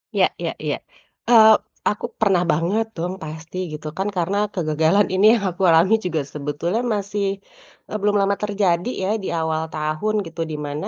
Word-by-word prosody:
Iya - - +5
iya - - -1
iya, - - -1 0.5
eee, 220 -2 +8 0.4
aku 210 - -3
pernah 195 -5 +3
banget 185 +9 +1
dong 175 +3 -2
pasti, 160 +3 -8 0.2
gitu 155 0 -7
kan, 195 +2 -1
karena 185 +4 0 0.2
kegagalan 160 +3 +2
ini 190 +3 +3
yang 200 - -3
aku 195 - -9
alami 170 +7 +5
juga 160 -4 0
sebetulnya 150 +9 -2
masih, 205 -3 -2 0.6
eee, 215 - -2
belum 205 0 +2
lama 200 0 +2
terjadi 200 -1 +1 0.2
ya, - - -1
di - - -3
awal 160 -1 -1
tahun 155 +8 -2
gitu, 165 0 -7
di 150 - -4
mana, 145 +1 -4
180 Hz, 170 wpm, -21 LUFS, 160-205 Hz, 0.6 s, eee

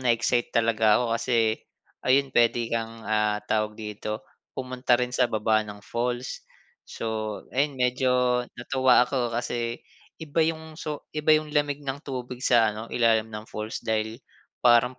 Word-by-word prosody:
na-excite 120 -1 +2
talaga 110 -2 +4
ako 115 -2 +1
kasi 115 -3 +1 0.4
ayun 135 +1 +3
pwede 120 0 +3
kang, 115 -1 -3
ah, 105 -1 +1
tawag 105 0 0
dito, 105 0 -5 0.3
pumunta 125 -1 +1
rin 125 0 -2
sa 125 -1 +2
baba 110 0 +2
ng 105 -1 -10
falls. 120 +2 -3 0.5
So 110 -2 -4
ayun, 140 +1 +1
medyo 125 0 +2
natuwa 125 0 +4
ako, 125 -2 -1
kasi 120 0 -2 0.4
iba 160 0 -1
yung 160 0 -3
so 150 -2 -5
iba 155 0 +4
yung 155 -1 -3
lamig 145 -1 +1
ng 135 +1 -3
tubig 125 -2 -5
sa 115 -3 +4
ano, 110 +2 -7
ilalim 115 -2 +3
ng 105 0 -6
falls 110 +1 -5
dahil 110 0 -1 0.4
parang 125 +1 +4
120 Hz, 150 wpm, -26 LUFS, 110-130 Hz, 0.5 s, talaga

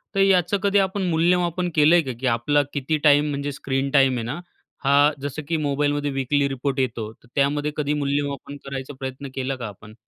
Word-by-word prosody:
तर - - +1
याचं 195 0 +3
कधी 200 0 +3
आपण 195 +1 0
मूल्यमापन 175 +1 +1
केलंय 160 +3 +6
का? 135 -5 -4
की 130 - -1
आपला 125 +5 +2
किती 145 +2 -1
टाईम 150 0 +5
म्हणजे 140 0 -3
स्क्रीन 135 0 -2
टाईम 135 -2 +4
आहे 115 - -3
ना, 125 +9 -4 0.4
हा 140 +2 +5
जसं 145 +2 -4
की 165 - 0
मोबाईलमध्ये 145 0 0
वीकली 140 +1 +1
रिपोर्ट 135 +1 -2
येतो, 115 -4 -2
तर 120 - -25
त्यामध्ये 145 +1 +1
कधी 150 -1 0
मूल्यमापन 140 -1 -2
करायचा 135 0 -6
प्रयत्न 135 +1 -6
केला 135 0 -2
का 125 -3 -6
आपण? 105 +1 -12
145 Hz, 190 wpm, -23 LUFS, 135-150 Hz, 0.4 s, केलंय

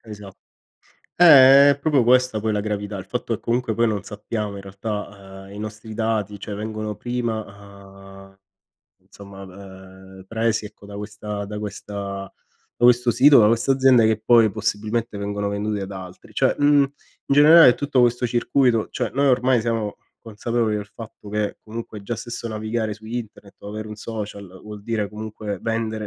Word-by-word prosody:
Esa 105 -3 -11 0.9
eh, 140 -4 +8
è 140 - 0
proprio 140 -3 +2
questa 125 -2 +3
poi 110 +1 -1
la 105 - 0
gravità, 105 -1 -4
il - - -7
fatto - - -3
che - - -7
comunque 120 -1 -1
poi 115 +1 +2
non 105 -3 -2
sappiamo 105 0 -5
in 100 - -8
realtà, 100 -1 -7
mhmm, - - -13
i 100 - -9
nostri 110 +1 -8
dati, 110 -2 -2
cioè 105 - -6
vengono 110 0 -5
prima, 120 -2 -3 0.9
uhm, 95 0 -23 0.6
insomma, 95 +1 -13
ehm, 95 0 -13
presi 115 0 -1
ecco 105 -1 -15
da 100 0 -9
questa 105 0 -6
da 105 +1 -6
questa 100 -1 -6 0.4
da - - -1
questo 125 0 +4
sito, 140 +3 +6
da 105 - +5
questa 115 +4 +2
azienda 130 -3 +4
che 110 -1 +2
poi 115 0 +4
possibilmente 110 +1 -3
vengono 100 0 -3
vendute 105 0 -3
ad 95 +1 -7
altri; 95 -1 -11
cioè - - +2
mhmm, 145 0 +4
in 135 0 -3 0.4
generale 150 -2 +8
tutto 145 -2 0
questo 120 0 +2
circuito 120 -1 +1
cioè, 125 -3 -3
noi 140 +1 +2
ormai 125 -1 +3
siamo 110 -2 -2 0.3
consapevoli 115 0 -2
del 105 -1 -5
fatto 110 -2 -11
che, 105 -1 -2
comunque 110 -2 -8
già 115 +3 -4
stesso 120 +1 -6
navigare 110 0 -3
su 110 +1 -12
internet, 110 -3 -7
o 100 - -10
avere 110 +1 -6
un 105 - -7
social 105 -2 -7 0.2
vuol 105 -1 -10
dire 110 -2 -2
comunque 105 -1 -6
vendere 110 -1 -2
110 Hz, 175 wpm, -22 LUFS, 105-120 Hz, 0.9 s, eh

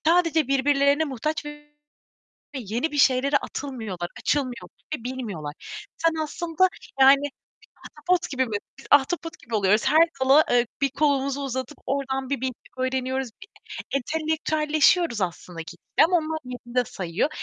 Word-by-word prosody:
sadece 330 -4 +3
birbirlerine 280 +2 +3
muhtaç 300 +3 -3
ve 295 0 -10 0.8
yeni 245 +5 -2
bir 290 - -2
şeylere 270 +1 +4
atılmıyorlar, 220 -12 -4
açılmıyor 250 -10 -1 0.3
bilmiyorlar. 225 - -5 0.4
Sen 330 0 +1
aslında, 335 +3 +1 0.3
yani, 275 +1 +7 0.6
ahtapot 360 -1 -1
gibi 260 -2 +1
mi? 230 - -9
Biz 205 - -1 0.2
biz - - -14
ahtapot 325 +4 +2
gibi 225 - -5
oluyoruz, 205 +1 +3
her 315 +4 +6
dala, 270 +4 +6
eee, 245 -1 +3
bir 275 - +3
kolumuzu 280 0 +1
uzatıp 260 +1 -4
oradan 270 -1 -2
bir 275 -3 -2
bilgi 260 -1 -1 0.2
öğreniyoruz. 260 0 -1
Bir 405 - -11 0.5
entelektüelleşiyoruz 310 - +1
aslında 175 -1 -4
gitgide 165 - +1
ama 355 +2 +3
onlar 315 -1 -2
yerinde 250 0 -2
sayıyor 185 - -2
275 Hz, 135 wpm, -25 LUFS, 245-305 Hz, 0.8 s, yani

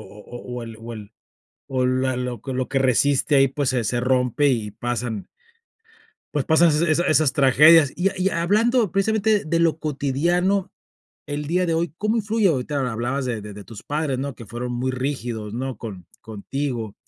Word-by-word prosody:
o 120 +5 -9
o 120 - -6
el 115 -1 -9
o 115 +1 -8
el 105 -1 -10 0.6
o 130 -1 0
la 130 0 +1
lo 125 -3 -4
que 135 - -5
lo 130 0 -2
que 135 0 0
resiste 135 +3 +2
ahí, 135 0 +5
pues, 140 -1 -1
se 125 -3 0
se 120 +3 -1
rompe 125 +3 +1
y 110 -5 -1
pasan 120 -3 -4 1.1
pues 145 -3 0
pasan 165 +2 +5
esa 155 +2 +2
esas 170 +3 +2
esas 155 -3 +3
tragedias, 145 +3 +6
y 185 +3 +1
ha - - -9
y 190 +1 +2
hablando 210 +5 +2
precisamente 215 +1 +1
de 165 +2 0
lo 165 -2 +2
cotidiano 170 +7 0 0.6
el 145 0 -4
día 180 +2 +1
de 165 - 0
hoy, 165 -2 -1
¿cómo 215 +2 0
influye? 215 -1 +1
Ahorita 140 -3 0
hablabas 125 +4 -2
de 120 -3 -3
de 105 0 -8
de 100 0 -10
tus 110 -1 -11
padres, 150 -2 -2
¿no?, 140 -2 -4
que 115 - -11
fueron 120 +3 -5
muy 130 +2 -2
rígidos, 120 -5 -4
¿no?, 130 0 -4
con 100 -6 -8
contigo, 115 +1 -4
135 Hz, 190 wpm, -22 LUFS, 120-160 Hz, 1.1 s, tragedias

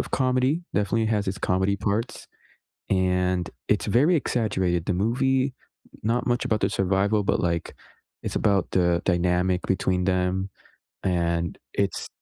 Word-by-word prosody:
of - - -4
comedy, 130 +5 +1
definitely 105 +3 +1
has 105 -2 0
its 95 - -3
comedy 95 +2 +2
parts, 105 +4 -2 0.6
and 90 -2 +1 0.2
it's - - +2
very 150 +9 +4
exaggerated. 95 - 0
The 95 - 0
movie 130 +2 +1 0.5
not 120 +3 0
much 120 -1 +1
about 110 - +1
the 95 - +2
survival, 100 +2 +1
but, - - +1
like, 85 -2 -1 0.5
it's - - -4
about 100 -3 +1
the 85 -1 +2
dynamic 90 0 +1
between 95 -1 +1
them, 95 +1 0 0.6
and 85 -2 0 0.2
it's 100 -1 -1
95 Hz, 140 wpm, -25 LUFS, 90-115 Hz, 0.6 s, very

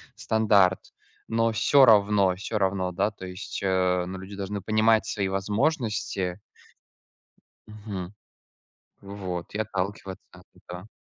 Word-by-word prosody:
стандарт, 105 -4 +2 0.4
но 115 0 +1
всё 135 +4 +5
равно, 100 -4 +4
всё 105 +3 -4
равно, 95 -2 0
да, 105 +4 0
то 95 - -10
есть, 90 +2 -7
э, 90 -2 +1
но 95 +1 -6
люди 95 +2 -9
должны 100 +1 -4
понимать 110 +2 +2
свои 100 -2 -2
возможности. 105 - -1 1.3
Мгм. 105 -3 -7 0.9
Вот 95 -3 -6
и - - -3
отталкиваться 100 -2 -4
от - - -20
этого. 90 +3 -10
100 Hz, 120 wpm, -26 LUFS, 95-110 Hz, 1.3 s, всё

